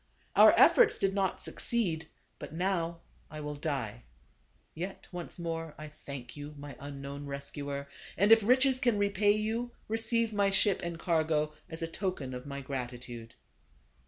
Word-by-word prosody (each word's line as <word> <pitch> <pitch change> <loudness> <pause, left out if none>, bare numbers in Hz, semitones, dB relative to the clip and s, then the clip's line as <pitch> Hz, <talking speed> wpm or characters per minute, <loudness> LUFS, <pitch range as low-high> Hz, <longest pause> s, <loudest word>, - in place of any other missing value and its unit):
Our - - +8
efforts 470 -3 +6
did 195 0 +1
not 195 -2 0
succeed, 170 -9 0 0.3
but - - -7
now, 170 -1 -1 0.3
I 155 - -7
will 150 0 -4
die. 140 - -3 0.7
Yet 185 +4 -6
once 175 -2 -6
more 165 -2 -4
I 155 0 -7
thank 140 -4 -9
you, 145 +1 -8
my 145 -1 -8
un 140 0 -7
known 140 +1 -6
rescuer; 140 0 -5 0.3
and 200 +4 +4
if 225 0 +9
riches 260 +4 +4
can 240 -5 +2
repay 205 0 +3
you, 225 +3 -2
receive 225 0 +1
my 200 -1 +3
ship 195 0 +3
and 170 -1 -4
cargo, 155 -3 +1 0.2
as 160 0 -4
a - - -1
token 165 -7 -3
of 125 +2 -7
my 140 0 -5
gratitude." 125 -3 -6
165 Hz, 160 wpm, -31 LUFS, 140-200 Hz, 0.7 s, if